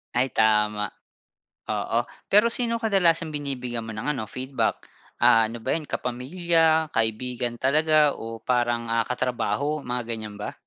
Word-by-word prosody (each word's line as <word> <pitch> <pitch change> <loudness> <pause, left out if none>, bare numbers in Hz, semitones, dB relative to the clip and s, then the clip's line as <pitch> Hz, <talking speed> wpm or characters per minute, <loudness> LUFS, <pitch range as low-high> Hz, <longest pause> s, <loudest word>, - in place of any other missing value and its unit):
Ay 130 +2 +2
tama. 105 -1 +2 0.8
Oo, - - -1 0.2
pero 215 +3 +5
sino 235 -2 0
kadalasang 175 -8 +2
binibigyan 125 -5 -3
mo - - -4
ng 145 +7 -1
ano, 110 -7 -5
feedback? 130 +3 -2 0.3
Ah, 115 -2 +5
ano 115 - -6
ba - - +1
'yan 155 -2 -3
kapamilya, 160 +5 +1
kaibigan 120 +2 -1
talaga 150 +3 +3
o 115 -2 -8
parang, 120 -1 0
ah, 115 -1 +1
katrabaho, 130 +4 -1
mga 125 -1 -3
ganyan 110 -3 -6
ba? 105 - -5
125 Hz, 140 wpm, -25 LUFS, 115-155 Hz, 0.8 s, pero